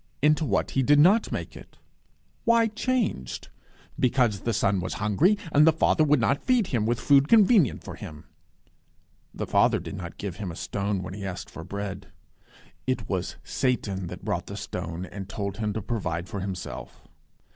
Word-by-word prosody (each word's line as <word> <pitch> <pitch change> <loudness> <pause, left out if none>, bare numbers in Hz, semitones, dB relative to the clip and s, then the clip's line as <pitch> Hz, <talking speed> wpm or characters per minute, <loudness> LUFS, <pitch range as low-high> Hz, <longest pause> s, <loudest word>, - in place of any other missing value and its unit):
Into 150 +1 +4
what - - 0
he 135 - +1
did 145 +3 +5
not 190 +9 +5
make - - -4
it. - - -13 0.7
Why 230 0 +4
changed? 215 - -2 0.5
Because 120 -5 +2
the 115 - -2
Son 100 -2 +1
was 90 +1 -3
hungry, 110 - +2
and 150 +2 +6
the - - +8
Father 155 0 +3
would 150 -2 +4
not 135 +4 +1
feed 250 -4 +3
him 115 -9 -1
with 120 0 0
food 140 +3 +4
convenient 210 - +5
for - - -7
him! 75 -1 -9 1.1
The - - -4
Father - - +3
did - - -7
not - - -7
give 95 -4 -5
him 100 -4 -4
a - - -8
stone 100 0 -2
when 90 - -6
he 100 0 -7
asked 95 -2 -6
for 80 - -8
bread. 100 0 -5 0.8
It 125 -5 -1
was 95 -2 -2
Satan 100 -8 -1
that - - -9
brought - - -2
the - - -6
stone 85 +2 -5
and 95 +1 -8
told 100 -1 -4
him 105 -1 -1
to 110 -1 -4
provide 90 -6 -3
for 100 - -5
himself. 95 -2 -7
110 Hz, 180 wpm, -26 LUFS, 95-150 Hz, 1.1 s, the